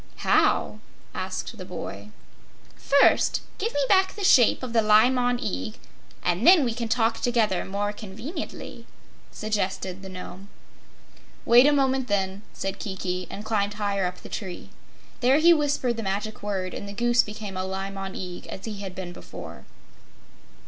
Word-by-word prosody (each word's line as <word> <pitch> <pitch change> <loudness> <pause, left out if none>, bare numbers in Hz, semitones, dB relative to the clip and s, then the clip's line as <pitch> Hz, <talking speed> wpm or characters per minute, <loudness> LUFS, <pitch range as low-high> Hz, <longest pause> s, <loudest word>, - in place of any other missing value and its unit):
"How?" - - +3 0.3
asked - - -5
the - - -5
boy. - - -7 0.7
"First 280 0 +3 0.2
give 450 +4 -1
me 290 - 0
back 380 -1 +3
the 410 - -5
shape 255 - +5
of 245 -2 -5
the 230 - +4
Li 215 +3 +5
Mon 245 -1 +1
Eag, 95 - -4 0.5
and 180 - +1
then 355 -4 +8
we 235 - 0
can 235 0 -3
talk 225 0 +1
together 225 -6 +1
more 205 +2 -2
conveniently," 225 - -7 0.4
suggested 195 -3 -2
the 190 - -8
Nome. 185 +1 -9 1.0
"Wait 245 +4 +7
a - - +5
moment, 265 -2 +1
then," 195 -1 -1
said 195 0 -4
Kiki, 185 -2 -4
and 205 - -7
climbed 205 -2 0
higher 200 -3 0
up 180 0 -6
the - - -8
tree. 190 -5 -6 0.5
There 255 +3 +4
he 340 +2 +7
whispered 285 -6 0
the - - -2
Magic 205 +1 -3
Word 195 -3 -3
and 200 - -6
the - - -7
Goose 240 +3 +3
became 210 -2 -7
a 185 - -2
Li 190 +1 -4
Mon 195 -1 -6
Eag, 180 -1 -7
as 190 - -8
he 210 -3 -5
had 190 -2 -6
been 180 -2 -6
before. - - -10
210 Hz, 165 wpm, -25 LUFS, 190-245 Hz, 1.0 s, then